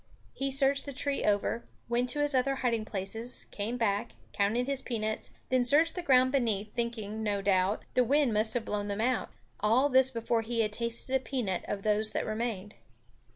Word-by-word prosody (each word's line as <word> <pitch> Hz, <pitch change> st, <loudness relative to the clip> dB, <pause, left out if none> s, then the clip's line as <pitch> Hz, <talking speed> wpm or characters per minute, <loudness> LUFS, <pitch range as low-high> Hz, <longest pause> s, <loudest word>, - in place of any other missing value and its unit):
He 275 Hz, 0 st, -2 dB
searched 275 Hz, +1 st, +3 dB
the 280 Hz, -, -5 dB
tree 280 Hz, +1 st, -2 dB
over, 210 Hz, +3 st, 0 dB, 0.2 s
went 240 Hz, +1 st, +1 dB
to 295 Hz, +3 st, +2 dB
his 290 Hz, 0 st, +3 dB
other 270 Hz, +1 st, +1 dB
hiding 230 Hz, -4 st, -1 dB
places, 220 Hz, +5 st, -2 dB
came 220 Hz, +4 st, -3 dB
back, 205 Hz, -, -1 dB, 0.2 s
counted 220 Hz, +5 st, +1 dB
his 275 Hz, 0 st, -1 dB
peanuts, 220 Hz, -4 st, -3 dB, 0.2 s
then 255 Hz, -1 st, +2 dB
searched 300 Hz, +7 st, +4 dB
the 360 Hz, -, -4 dB
ground 260 Hz, -5 st, +4 dB
beneath, 220 Hz, -6 st, 0 dB
thinking, 225 Hz, -3 st, -3 dB
no 205 Hz, -2 st, -1 dB
doubt, 190 Hz, +1 st, +1 dB
the 250 Hz, -, +4 dB
wind 275 Hz, -1 st, +2 dB
must 220 Hz, +2 st, +2 dB
have 240 Hz, -, -1 dB
blown 205 Hz, -1 st, -2 dB
them 200 Hz, +1 st, -3 dB
out 245 Hz, +1 st, 0 dB, 0.3 s
all 235 Hz, +7 st, +3 dB
this 260 Hz, -1 st, +5 dB
before 230 Hz, -2 st, -1 dB
he 230 Hz, +1 st, -1 dB
had 210 Hz, -1 st, -1 dB
tasted 235 Hz, +3 st, -1 dB
a -, -, +3 dB
peanut 245 Hz, -9 st, -3 dB
of 195 Hz, -1 st, -4 dB
those 215 Hz, 0 st, +2 dB
that -, -, -1 dB
remained. 215 Hz, -2 st, -4 dB
235 Hz, 195 wpm, -30 LUFS, 210-260 Hz, 0.3 s, this